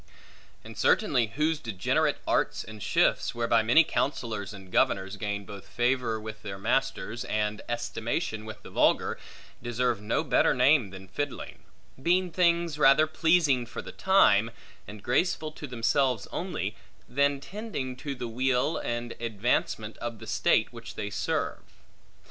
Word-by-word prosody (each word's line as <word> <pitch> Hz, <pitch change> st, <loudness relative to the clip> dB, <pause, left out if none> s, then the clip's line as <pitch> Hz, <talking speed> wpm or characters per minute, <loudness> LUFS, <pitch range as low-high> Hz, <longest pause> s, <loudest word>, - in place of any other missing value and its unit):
And -, -, -10 dB
certainly 130 Hz, -, +3 dB
whose 155 Hz, +1 st, +1 dB
degenerate 110 Hz, -9 st, 0 dB
arts -, -, +1 dB
and 110 Hz, -1 st, -10 dB
shifts, -, -, +1 dB
whereby 115 Hz, -1 st, +3 dB
many 120 Hz, +9 st, +6 dB
counsellors 115 Hz, -, -2 dB
and 95 Hz, -3 st, -12 dB
governors 95 Hz, +1 st, +1 dB
gain 105 Hz, -1 st, -3 dB
both 100 Hz, 0 st, -10 dB
favor 120 Hz, -2 st, 0 dB
with 110 Hz, 0 st, -8 dB
their 100 Hz, -2 st, -6 dB
masters, 120 Hz, +1 st, -1 dB
and 105 Hz, 0 st, -1 dB
estimation 115 Hz, 0 st, -2 dB
with 110 Hz, -1 st, -9 dB
the -, -, -11 dB
vulgar, -, -, +2 dB, 0.4 s
deserve 120 Hz, -2 st, -1 dB
no 105 Hz, -, 0 dB
better -, -, +3 dB
name 125 Hz, -3 st, +4 dB
than 95 Hz, 0 st, -11 dB
fiddling; 145 Hz, +9 st, -5 dB, 0.4 s
being 180 Hz, +4 st, +2 dB
things 170 Hz, -3 st, +2 dB
rather 140 Hz, +2 st, +6 dB
pleasing 155 Hz, -6 st, +2 dB
for -, -, -7 dB
the -, -, -8 dB
time, 115 Hz, -, +4 dB, 0.4 s
and 105 Hz, -1 st, -10 dB
graceful 155 Hz, +4 st, 0 dB
to 150 Hz, -1 st, -8 dB
themselves 125 Hz, -1 st, +1 dB
only, 155 Hz, -, -3 dB, 0.3 s
than 140 Hz, +1 st, +1 dB
tending 185 Hz, -, -5 dB
to 140 Hz, +1 st, -5 dB
the 125 Hz, -, -5 dB
weal 125 Hz, +5 st, +1 dB
and 120 Hz, 0 st, -3 dB
advancement 110 Hz, -1 st, -1 dB
of 120 Hz, -1 st, -5 dB
the 110 Hz, -, -10 dB
state 110 Hz, +1 st, +2 dB
which 115 Hz, -1 st, -9 dB
they 105 Hz, -1 st, -4 dB
serve. -, -, -2 dB
120 Hz, 145 wpm, -28 LUFS, 110-145 Hz, 0.4 s, many